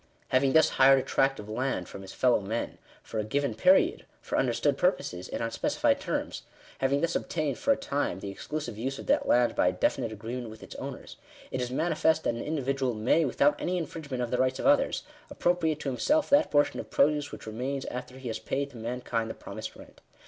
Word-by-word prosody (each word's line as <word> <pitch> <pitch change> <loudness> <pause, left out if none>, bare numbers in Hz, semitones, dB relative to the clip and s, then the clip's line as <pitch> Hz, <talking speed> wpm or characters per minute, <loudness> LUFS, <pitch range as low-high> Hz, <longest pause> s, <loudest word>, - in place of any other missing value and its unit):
Having 130 +1 +3
thus 160 -1 +6
hired 135 +1 +8
a 130 - 0
tract 135 0 +1
of 105 - -8
land 110 -4 -2
from 95 - -9
his 95 - -9
fellow 125 -2 +3
men, 110 +4 -4 0.2
for 110 - -4
a - - 0
given 140 +3 -1
period, 180 - +4 0.2
for - - -4
understood - - +2
purposes, 90 +1 -1
and - - -3
on 115 - -2
specified 115 - +1
terms - - -3 0.2
— - - -22
having 135 +2 +1
thus 170 0 0
obtained, 155 -4 -2
for 280 - +2
a 275 - +4
time, 140 - -2
,the 100 0 -5
exclusive 120 +1 -5
use 135 +3 -2
of - - -8
that - - +2
land 120 0 +4
by - - +3
a - - +4
definite 115 - 0
agreement 115 +3 -5
with 110 0 -11
its - - -10
owners, - - -7 0.3
it 130 - -2
is 125 - -2
manifest 160 +3 +1
that - - +1
an 115 - -5
individual 135 -4 -1
may, 125 +9 +3
without 140 +2 +2
any 180 +1 0
infringement 145 -6 -4
of 120 - -4
the 125 - 0
rights 130 0 +2
of - - -4
others, 285 +1 +3 0.3
appropriate 165 -3 +1
to 140 - -2
himself 295 - +1
that 290 +2 +5
portion 145 -1 +2
of - - -7
produce 145 0 +2
which - - -9
remains 130 +5 -3
after 125 +1 -6
he 130 -1 -8
has 115 - -3
paid 140 +1 -2
to 125 - -11
mankind 115 -1 -3
the - - -5
promised 110 +2 -7
rent. - - -15
130 Hz, 220 wpm, -28 LUFS, 115-145 Hz, 0.3 s, hired